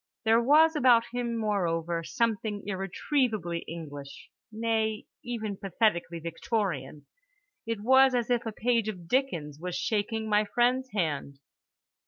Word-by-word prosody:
There 225 +1 +5
was 310 +6 +5
about 245 -5 +5
him, 240 -1 -2
moreover, 170 -6 -1
something 220 0 -1
irretrievably 195 - -1
English, 145 -4 -9 0.2
nay 220 -1 -1 0.2
even 220 -4 -4
pathetically 190 -3 0
Victorian—it 215 - -5
was 265 +3 +5
as 240 0 0
if 240 -1 +2
a - - -2
page 230 0 0
of 180 -5 -7
Dickens 170 - -1
was 180 +1 -4
shaking 220 +1 -1
my 210 0 +3
friend's 245 +5 +1
hand. 150 -7 -2
215 Hz, 120 wpm, -28 LUFS, 175-240 Hz, 0.2 s, There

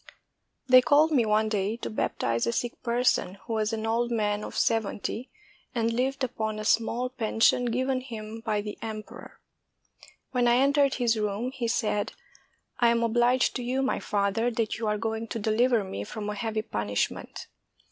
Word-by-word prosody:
] - - -51
They 255 0 +10
called 300 +4 +4
me 245 -7 +3
one 215 +1 +3
day 210 +1 -1
to - - -5
baptize 115 - -1
a - - +2
sick 240 +1 -3
person, 240 -5 +1
who 230 - -4
was 215 0 0
an 220 -1 -3
old 235 +2 +1
man 210 -2 0
of - - -6
seventy, 225 +2 -1 0.5
and 230 -1 +1
lived 265 +3 -1
upon 220 -4 -2
a 215 - -5
small 230 +3 +1
pen 225 -3 -4
sion 245 +2 +5
given 255 +2 0
him 225 -3 -7
by 215 -2 0
the 210 0 -7
emperor. 215 -1 -8 0.9
When 250 -2 +2
I 240 - +5
entered 280 +1 +3
his 235 -3 +1
room, 210 +4 -2
he 255 -3 -3
said, 210 -3 0 0.7
*'I 240 - +5
am 235 0 +3
obliged 240 +2 +2
to 250 - -5
you, 260 +2 0
my 265 - 0
father, 205 +3 0
that 225 -3 -2
you 225 - -2
are 210 0 +1
going 225 +1 -3
to 230 - -4
deliver 225 +1 +2
me 100 - -5
from 210 - -5
a - - -3
heavy 215 +1 -2
punishment." 105 - -3
225 Hz, 185 wpm, -27 LUFS, 215-245 Hz, 0.9 s, They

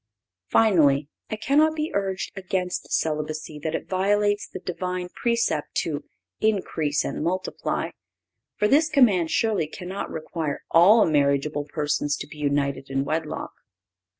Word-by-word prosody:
Finally, 150 -10 +4 0.2
it 215 0 -5
cannot 305 +5 +4
be 310 0 -2
urged 195 -1 -2
against 185 -1 -3
celibacy 155 0 -2
that 160 +2 -2
it - - -4
violates 205 +2 +1
the - - -8
Divine 180 0 -4
precept 230 -9 -1
to 150 -2 -2 0.3
"increase 165 -9 0
and - - -3
multiply;" 185 +3 -2 0.6
for 210 - +2
this 305 +6 +4
command 215 - +4
surely 210 -7 +1
cannot 180 +5 -6
require 160 -2 -4
all 205 +7 +7
marriageable 145 -1 +1
persons 145 -1 -1
to - - -6
be 150 - -13
united 140 -2 -1
in 135 0 -1
wedlock. 155 +1 -3
170 Hz, 130 wpm, -25 LUFS, 150-205 Hz, 0.6 s, all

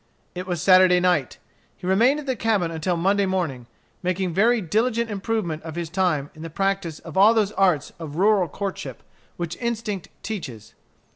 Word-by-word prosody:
It 180 +1 -6
was 175 -2 -2
Saturday 185 -1 +6
night. 175 -7 +1 0.4
He - - -10
remained 230 +10 +3
at 300 - -8
the 260 -2 -1
cabin 210 -7 0
until 165 +2 -1
Monday 195 +3 +2
morning, 160 -11 -2 0.3
making 185 -1 -1
very 230 +6 +3
diligent 225 +5 0
improvement 195 -6 -2
of 160 -1 -8
his 170 -2 -4
time 170 -7 0
in 155 - -13
the 165 - -6
practice 195 -2 -1
of 165 +1 -9
all 210 +4 +6
those 210 -2 +2
arts 185 -9 +1
of 155 -3 -7
rural 195 0 +3
courtship 195 +5 -6 0.3
which 170 -1 -4
instinct 225 -5 -3
teaches. 130 - -6
185 Hz, 170 wpm, -23 LUFS, 165-210 Hz, 0.4 s, Saturday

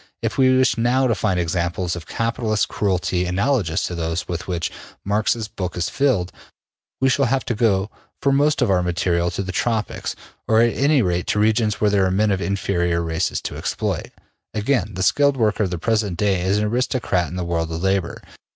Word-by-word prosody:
If - - -1
we 130 -1 +4
wish 130 -2 +2
now 125 +3 +2
to 120 - +2
find 95 -5 0
examples 85 +1 -1
of 85 -1 -8
capitalist 115 -2 -1
cruelty 90 -2 0
analogous 95 - 0
to - - -4
those 80 0 -3
with 85 -1 -4
which 85 -3 -2 0.3
Marx's 110 +2 0
book 90 -4 -5
is 85 0 -1
filled, 115 -11 +1 0.7
we 135 - +3
shall 135 +1 +3
have 130 +2 0
to - - -1
go 105 -3 +1 0.3
for 140 - +2
most 145 +2 +3
of 100 - +1
our 90 -1 +3
material 85 0 0
to 85 +3 -3
the 95 - -4
Tropics, 110 +3 -2 0.3
or 110 0 +4
at 115 0 +4
any 140 -1 +3
rate 90 -1 -1
to 105 - +1
regions 110 0 +2
where 105 -1 +2
there 100 -2 +3
are - - +1
men 105 +3 +2
of 95 -1 0
inferior 90 -4 0
races 80 -1 -1
to - - -5
exploit. - - -2 0.5
Again: 105 -3 0
the 95 - -1
skilled 140 +7 +3
worker 110 -2 +1
of - - -3
the 90 - -3
present 105 -1 0
day 100 -3 +1
is 95 +3 +1
an 105 - +1
aristocrat 115 -5 0
in 90 - -7
the 90 -1 -3
world 85 -1 -1
of 80 +2 -4
labor. 95 -2 -1
100 Hz, 205 wpm, -21 LUFS, 90-115 Hz, 0.7 s, we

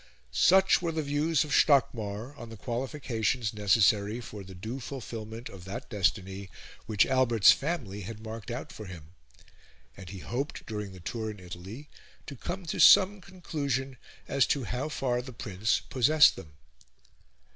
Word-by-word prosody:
Such 190 - +5
were 170 -2 -1
the 160 -1 -2
views 145 +2 +1
of 150 - -8
Stockmar 120 -4 +2
on 120 -5 -10
the 115 - -10
qualifications 120 -1 -2
necessary 105 +1 +3
for 105 -4 -8
the 95 0 -11
due 110 +8 -6
fulfilment 115 -3 -7
of 95 -2 -11
that 120 +8 -7
destiny 95 0 -1 0.4
which 105 -2 +3
Albert's 125 -5 +5
family 130 - -2
had 110 +3 -7
marked 110 0 -7
out 125 +5 -5
for 110 -6 -9
him; 85 -4 -11 0.8
and 95 -1 -10
he 100 - -8
hoped, 125 - -4
during 105 -3 -5
the 95 - -11
tour 110 +5 -4
in 105 -1 -8
Italy, 95 +10 -9 0.4
to 140 - -8
come 175 +8 -5
to 160 - -4
some 195 +1 +7
conclusion 140 -8 -3 0.3
as 135 - +2
to 140 - 0
how 125 +6 -3
far 125 -4 -1
the 130 0 -10
prince 110 -2 -1
possessed 150 +5 +4
them. 75 -2 -11
115 Hz, 155 wpm, -29 LUFS, 100-140 Hz, 0.8 s, some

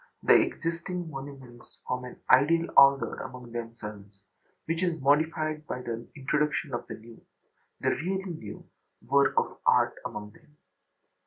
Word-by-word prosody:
The - - +6
existing 170 +1 0
monuments 135 -3 -10
form 125 0 -2
an 125 - -10
ideal 165 +6 +5
order 140 0 +6
among 125 -2 -8
themselves, 105 -4 -8 0.4
which 165 +1 -1
is 175 -3 0
modified 155 +2 +1
by 125 - -4
the 115 0 -5
introduction 150 +1 -1
of 120 - -4
the - - -6
new 115 +1 -15 0.6
(the - - +2
really 190 +3 -2
new) 110 -10 -9 0.4
work - - +3
of - - 0
art - - +4
among 105 0 -6
them. 150 +5 -23
140 Hz, 140 wpm, -28 LUFS, 120-160 Hz, 0.6 s, The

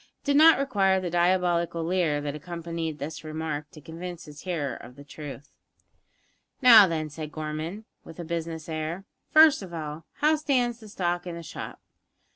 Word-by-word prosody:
It - - -36
did 285 -1 +2
not 320 +1 +8
require 200 -9 +2
the 180 -2 -4
diabolical 175 -1 +1
leer 165 -4 +1
that 145 -1 -3
accompanied 165 0 -5
this 150 +2 -6
remark 155 -1 -4
to 155 - -13
convince 170 +3 -8
his 150 -1 -11
hearer 150 -9 -3
of 125 +2 -12
its 140 0 -13
truth. 145 -2 -9 1.1
"Now, 230 -6 +9
then," 160 -2 -2
said 155 0 -7
Gorman, 155 +7 -5 0.2
with 165 - -12
a - - -4
business 165 -1 -4
air, 160 +4 -4 0.2
"first 310 -4 +7
of 180 -3 -8
all, 155 0 -6
how 310 +1 +2
stands 250 -5 0
the 220 - -12
stock 175 -2 -2
in 175 - -5
the 170 - -8
shop?" - - -8
170 Hz, 175 wpm, -27 LUFS, 155-185 Hz, 1.1 s, Now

